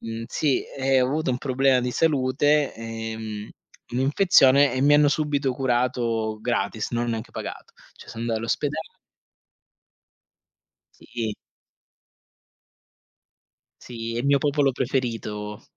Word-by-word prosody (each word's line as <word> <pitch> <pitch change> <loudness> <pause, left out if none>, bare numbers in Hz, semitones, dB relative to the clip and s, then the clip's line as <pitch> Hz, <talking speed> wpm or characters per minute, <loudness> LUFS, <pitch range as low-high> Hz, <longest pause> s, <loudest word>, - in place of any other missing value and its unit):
Mh, 115 0 -6
sì, 140 +1 0
e 135 -1 +1
ho 125 - +3
avuto 150 -1 -1
un 125 - -1
problema 130 -1 +2
di 125 - -2
salute 145 0 +2
e 115 0 -6
mhmm, 110 -1 -6 0.5
un'infezione 140 -1 +4
e 130 - -1
mi 145 +1 +5
hanno 145 0 +5
subito 145 -3 0
curato 120 -4 0
gratis. 115 -1 -2
Non 120 0 -1
ho - - -3
neanche 115 0 -4
pagato. - - -7 0.2
Cioè, - - -15
so 115 - -9
anda 115 -1 -1
all'ospeda 115 +1 -2 2.2
Sì. 110 -3 -4 2.5
Sì, 115 -1 -6
è 120 - -1
il 125 - -2
mio 140 0 +4
popolo 145 -1 +1
preferito 115 -5 -3
125 Hz, 125 wpm, -24 LUFS, 115-140 Hz, 2.5 s, mi